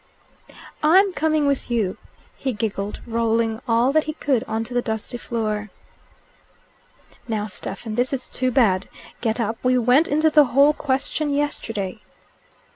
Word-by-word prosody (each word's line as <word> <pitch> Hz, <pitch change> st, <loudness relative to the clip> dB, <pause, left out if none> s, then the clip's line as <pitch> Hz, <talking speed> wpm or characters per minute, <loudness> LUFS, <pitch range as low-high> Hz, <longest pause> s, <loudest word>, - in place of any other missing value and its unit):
"I'm 375 Hz, +5 st, +5 dB
coming 310 Hz, -2 st, +1 dB
with 280 Hz, -2 st, 0 dB
you," 220 Hz, -6 st, 0 dB, 0.4 s
he 265 Hz, -, -3 dB
giggled, 205 Hz, -2 st, -3 dB
rolling 230 Hz, 0 st, 0 dB
all 235 Hz, +3 st, +3 dB
that 310 Hz, +1 st, +2 dB
he 310 Hz, -, -3 dB
could 275 Hz, -6 st, 0 dB
on 225 Hz, 0 st, -2 dB
to 240 Hz, +2 st, -8 dB
the 245 Hz, -, +2 dB
dusty 220 Hz, +2 st, -4 dB
floor. 215 Hz, -3 st, -3 dB, 1.6 s
"Now, 215 Hz, -3 st, -1 dB
Stephen, 215 Hz, +2 st, -6 dB
this 245 Hz, +3 st, 0 dB
is 265 Hz, -2 st, -3 dB
too 255 Hz, 0 st, -1 dB
bad. 210 Hz, -7 st, +2 dB, 0.3 s
Get 225 Hz, 0 st, -1 dB
up. 225 Hz, 0 st, -2 dB
We 255 Hz, 0 st, +3 dB
went 250 Hz, +6 st, +4 dB
into 310 Hz, +2 st, +2 dB
the 300 Hz, -1 st, +6 dB
whole 280 Hz, +4 st, +4 dB
question 285 Hz, +2 st, -1 dB
yesterday." 225 Hz, -9 st, -2 dB
240 Hz, 145 wpm, -22 LUFS, 220-280 Hz, 1.6 s, the